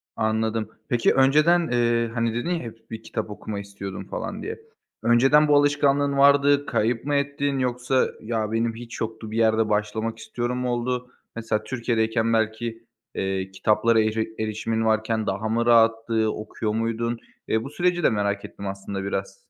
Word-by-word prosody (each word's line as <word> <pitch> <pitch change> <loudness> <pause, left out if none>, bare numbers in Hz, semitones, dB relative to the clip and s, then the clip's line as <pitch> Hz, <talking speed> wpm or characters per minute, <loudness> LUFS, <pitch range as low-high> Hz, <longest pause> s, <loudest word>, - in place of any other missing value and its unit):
Anladım. 110 0 0 0.2
Peki, 120 -1 +3
önceden, 155 +6 +4
eee, 120 -1 +1
hani, 115 -1 0
dedin 120 +9 -2
ya 175 -2 0
hep 115 -1 -11
bir 110 0 -7
kitap 110 -2 -4
okuma 105 0 -6
istiyordum 100 -1 -7
falan - - -5
diye. 450 +1 -5 0.4
Önceden 135 +6 +5
bu 145 - +4
alışkanlığın 145 -1 +3
vardı, 140 0 +5
kayıp 115 +3 0
mı 145 0 0
ettin 140 -1 0
yoksa 125 +1 +1
ya 110 -1 -2
benim 115 0 0
hiç 115 0 -9
yoktu 110 -1 -5
bir 110 - -3
yerde 110 -1 +3
başlamak 110 +2 -1
istiyorum 120 +2 -3
mu 125 0 -1
oldu? 125 +1 -2 0.2
Mesela 110 -2 -2
Türkiye'deyken 115 -1 0
belki, 115 +1 -1 0.3
eee, 95 0 -2
kitaplara 110 +4 +2
eri 110 +1 -1
erişimin 110 +1 -1
varken 110 0 0
daha 105 +3 -2
mı 115 +1 +1
rahattı, 115 -1 +3
okuyor 110 0 -4
muydun? 115 +1 -1 0.3
Eee, 110 0 0
bu 135 - -6
süreci 175 +3 0
de - - +5
merak 100 -1 -1
ettim 100 - -8
aslında 95 0 -5
biraz. 95 0 -3
115 Hz, 165 wpm, -24 LUFS, 110-125 Hz, 0.4 s, Önceden